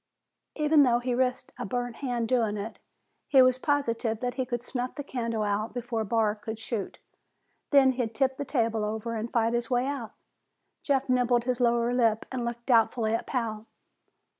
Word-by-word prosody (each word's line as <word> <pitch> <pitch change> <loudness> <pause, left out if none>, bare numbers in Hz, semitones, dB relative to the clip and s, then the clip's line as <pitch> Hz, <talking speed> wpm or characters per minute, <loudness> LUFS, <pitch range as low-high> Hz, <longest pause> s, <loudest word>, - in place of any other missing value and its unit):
Even 300 0 +4
though 245 -4 +4
he 245 +1 -2
risked 250 0 0
a - - -2
burned 245 +2 -3
hand 245 -4 -2
doing 225 -4 +1
it, 210 +3 -6 0.5
he 275 - +5
was 255 0 +3
positive 235 -6 0
that 245 0 -2
he 260 0 -3
could 240 -1 -3
snuff 250 0 -4
the 290 - -5
candle 230 -5 -2
out 210 +3 -1
before 240 -2 -2
Barr 215 0 +1
could 220 +1 -7
shoot. 225 -2 -4 0.7
Then 275 -2 +6
he'd 240 -3 -3
tip 265 +2 +1
the - - -2
table 230 -5 0
over 220 +2 -3
and 225 +1 -4
fight 230 -1 +1
his 240 -1 -1
way 245 0 +1
out. 270 -5 -4 0.7
Jeff 275 -2 0
nibbled 250 -1 +2
his 250 0 -1
lower 235 0 +2
lip 225 -3 +2
and 255 -2 -3
looked 235 0 -4
doubtfully 225 -2 +3
at 230 - -2
Pal. 225 -4 -3
240 Hz, 185 wpm, -28 LUFS, 225-255 Hz, 0.7 s, Then